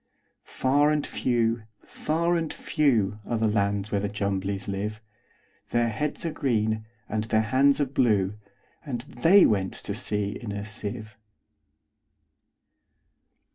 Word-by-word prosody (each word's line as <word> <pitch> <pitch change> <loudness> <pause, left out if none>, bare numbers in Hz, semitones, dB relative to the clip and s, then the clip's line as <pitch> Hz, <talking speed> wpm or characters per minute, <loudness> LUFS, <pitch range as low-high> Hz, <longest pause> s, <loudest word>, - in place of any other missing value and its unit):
Far 145 +3 +2
and 150 -1 +1
few, 115 -2 0 0.2
far 170 +3 -1
and 165 -2 -1
few, 110 - +1
Are 115 - -2
the 110 - +1
lands 100 0 0
where 100 - +1
the 100 - -2
Jumblies 100 -1 -2
live:Their 105 +3 -4
heads 145 +9 -3
are 165 - -1
green, 110 -7 0 0.2
and 110 +1 -2
their 110 0 +2
hands 135 +6 +3
are 145 - +3
blue; 110 -7 +2 0.5
And 130 -6 -4
they 165 +10 +5
went 95 -3 +1
to 100 - -4
sea 105 -2 -1
in 115 -4 -5
a 100 0 -4
sieve. 105 +1 -5
110 Hz, 130 wpm, -26 LUFS, 105-130 Hz, 0.5 s, they